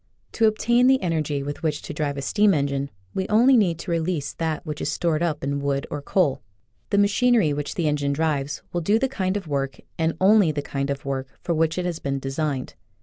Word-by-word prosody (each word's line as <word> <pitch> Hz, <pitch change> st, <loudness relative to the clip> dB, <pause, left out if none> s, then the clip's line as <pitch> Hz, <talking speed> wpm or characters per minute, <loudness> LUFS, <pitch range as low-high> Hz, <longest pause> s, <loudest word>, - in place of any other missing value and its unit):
To 225 Hz, -, +3 dB
obtain 240 Hz, +3 st, +3 dB
the 265 Hz, 0 st, +5 dB
energy 155 Hz, -5 st, -1 dB
with 145 Hz, +1 st, -5 dB
which 155 Hz, -3 st, -1 dB
to -, -, -6 dB
drive 145 Hz, -1 st, -2 dB
a 140 Hz, -, -4 dB
steam 205 Hz, +6 st, +3 dB
engine 140 Hz, -1 st, -1 dB, 0.2 s
we 190 Hz, -, -2 dB
only 235 Hz, +5 st, +5 dB
need 185 Hz, -8 st, +3 dB
to 170 Hz, +1 st, -6 dB
release 165 Hz, -3 st, -1 dB
that 160 Hz, -2 st, -3 dB
which 150 Hz, 0 st, -5 dB
is -, -, -1 dB
stored 165 Hz, -2 st, 0 dB
up 160 Hz, -3 st, -1 dB
in 140 Hz, +1 st, -1 dB
wood 140 Hz, -1 st, -1 dB
or 145 Hz, -, -3 dB
coal. 145 Hz, -3 st, +1 dB, 0.5 s
The 200 Hz, -, +1 dB
machinery 205 Hz, -4 st, +3 dB
which 145 Hz, 0 st, -4 dB
the 170 Hz, -3 st, 0 dB
engine 145 Hz, -1 st, 0 dB
drives 145 Hz, -2 st, -1 dB
will 175 Hz, -, 0 dB
do 205 Hz, +7 st, +3 dB
the 265 Hz, +3 st, +1 dB
kind 195 Hz, -7 st, -1 dB
of 200 Hz, -, -6 dB
work 135 Hz, -2 st, -2 dB, 0.2 s
and 160 Hz, 0 st, 0 dB
only 195 Hz, -3 st, +5 dB
the 145 Hz, -1 st, -3 dB
kind 140 Hz, 0 st, -2 dB
for 135 Hz, -1 st, -4 dB, 0.2 s
which 165 Hz, -1 st, +1 dB
it 180 Hz, -, -1 dB
has 170 Hz, -2 st, -2 dB
been 140 Hz, 0 st, -2 dB
designed. 135 Hz, 0 st, -3 dB
160 Hz, 215 wpm, -24 LUFS, 140-190 Hz, 0.5 s, the